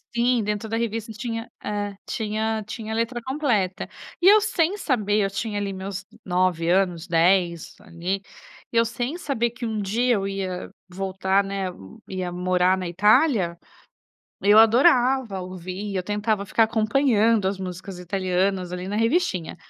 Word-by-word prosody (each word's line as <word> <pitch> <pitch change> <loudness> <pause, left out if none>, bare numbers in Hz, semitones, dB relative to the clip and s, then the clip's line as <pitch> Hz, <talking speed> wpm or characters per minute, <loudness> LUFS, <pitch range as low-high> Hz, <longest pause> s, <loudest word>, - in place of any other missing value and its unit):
Sim. 240 -1 +2
Dentro 210 +1 -3
da 225 - -1
revista 225 -1 -3
tinha 225 +1 -5
é, 205 -1 -3
tinha 220 0 -2
tinha 220 0 -5
a - - -2
letra 230 +2 -1
completa. 245 - -1 0.3
E, 365 - +5
eu 430 - +7
sem 395 -2 0
saber, 215 - 0
eu 195 - 0
tinha 210 +1 -3
ali 200 -1 -2
meus 195 +1 -6 0.2
9 180 -2 +1
anos, 180 -2 +1
10, 170 0 +2
ali. 185 0 -3 0.5
E, 230 - -1
eu 230 - +5
sem 245 +8 -3
saber 240 -8 -1
que 240 +1 -7
um 220 -2 -2
dia 240 +5 +1
eu 195 -1 -1
ia 190 -2 -4 0.2
voltar, 190 +1 0
né, 195 0 -3 0.4
ia 185 -2 -4
morar 180 +1 +2
na 185 -2 -4
Itália, 200 - +3 0.9
eu 205 +2 +6
adorava 245 -1 +4
ouvir, 185 +2 -6
eu 185 - -1
tentava 210 +1 -1
ficar 225 +3 +3
acompanhando 225 -1 +2
as 195 +1 0
músicas 185 0 -7
italianas, 185 0 -1
ali, 180 +1 -5
na 205 - -2
revistinha. 225 - 0
205 Hz, 155 wpm, -24 LUFS, 185-230 Hz, 0.9 s, eu